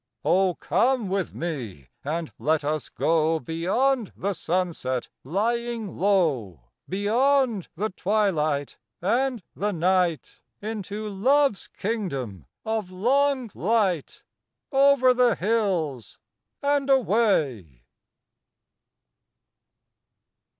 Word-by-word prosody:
Oh, 185 -1 +3
come 230 - +1
with 190 -2 -2
me, 120 - -5
and 160 +3 -3
let 150 +5 +1
us 150 0 -2
go 160 0 +1
Beyond 195 - 0
the 200 +1 -1
sunset 165 -8 -2
lying 225 - -2
low, 140 - 0 0.2
Beyond 230 +2 +2
the 215 +5 -2
twilight 170 -9 0 0.2
and 240 +3 0
the 210 +1 -1
night, 180 -2 0 0.2
Into 215 0 -5
Love's 255 +4 +2
kingdom 135 - -4 0.2
of 220 -4 -2
long 255 +4 +1
light, 195 -6 0 0.5
Over 270 -2 +5
the 245 -3 +3
hills 180 - -1 0.5
and 280 -1 +1
away. 160 - +1
195 Hz, 85 wpm, -25 LUFS, 160-230 Hz, 0.5 s, Over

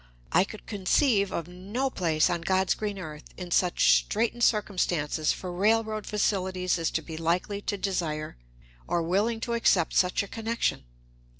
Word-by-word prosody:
I 185 - +4
could 215 - -11
conceive 200 0 +2
of 170 -3 -3
no 200 +10 -3
place 160 -7 +2
on 170 -1 -1
"God's 190 +2 +2
green 205 -2 -4
earth" 155 -4 -8
in 180 -1 -7
such 180 +1 +4
straitened 235 +2 -1
circumstances 175 -8 +1
for 185 - -5
railroad 215 +3 +1
facilities 185 -4 0
as 165 - 0
to 160 - -2
be 160 +1 -7
likely 180 +5 -1
to 205 - -2
desire 165 -6 -2 0.5
or 170 -1 0
willing 205 +7 +1
to 235 - -2
accept 195 -7 +2
such 180 +2 +2
a - - -8
connection. 225 - -2
185 Hz, 160 wpm, -27 LUFS, 170-210 Hz, 0.5 s, I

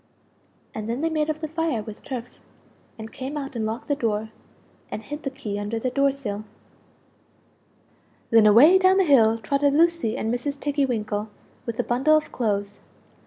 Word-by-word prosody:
And 215 0 -5
then 240 +4 -2
they 325 0 0
made 310 -1 0
up 310 0 -3
the 310 - -2
fire 315 -7 -2
with 215 -1 -10
turf, 250 -4 -5 0.7
and 220 0 -9
came 270 +3 -5
out 275 -2 -6
and 220 -2 -1
locked 225 +2 -5
the 290 - +1
door, 220 -4 -2 0.6
and 215 - -6
hid 295 +7 -7
the 275 - -3
key 225 -7 -5
under 205 +2 -3
the 250 +3 -2
door 275 +1 +2
sill. 215 -7 -5 1.9
Then 225 -2 +6
away 290 - +7
down 375 0 +4
the 385 - +5
hill 230 -8 +4
trotted 280 +6 +1
Lucie 335 -8 +2
and 225 +2 -1
Mrs. 280 +3 -3
Tiggy 285 -1 0
winkle 215 -3 -2 0.4
with 230 -1 -4
the - - 0
bundles 300 +6 +3
of - - -19
clothes! 205 -3 -2
250 Hz, 180 wpm, -24 LUFS, 220-290 Hz, 1.9 s, away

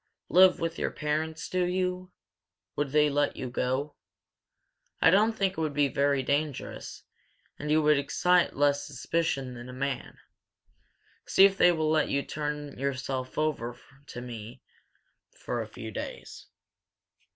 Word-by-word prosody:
"Live 185 +1 +6
with 165 0 -3
your - - 0
parents, 155 +1 -3
do 185 0 0
you? 180 0 -2 0.6
Would 145 -1 -1
they 150 +1 +4
let 145 0 0
you 130 -2 -5
go? 130 +4 -1 1.0
I 165 - +6
don't 215 +4 +4
think 195 -3 0
it 160 - -4
would 155 -3 -2
be 145 -1 +3
very 140 +1 +1
dangerous, 145 0 -3 0.6
and 150 - -4
you 155 +1 +3
would 150 -1 +4
excite 180 +5 +2
less 145 0 +2
suspicion 140 -2 -2
than 120 +1 -9
a - - -8
man. 135 0 -4 1.1
See 195 - +7
if 195 0 +3
they 180 - +6
will 155 -2 0
let 155 -1 +2
you 140 0 0
turn 150 -2 -5
yourself 130 -1 -3
over 135 -6 -1 0.3
to 120 - -7
me 120 0 -9 0.7
for 120 -1 -3
a 110 - -5
few 110 0 -8
days. - - -7
145 Hz, 150 wpm, -28 LUFS, 130-165 Hz, 1.1 s, See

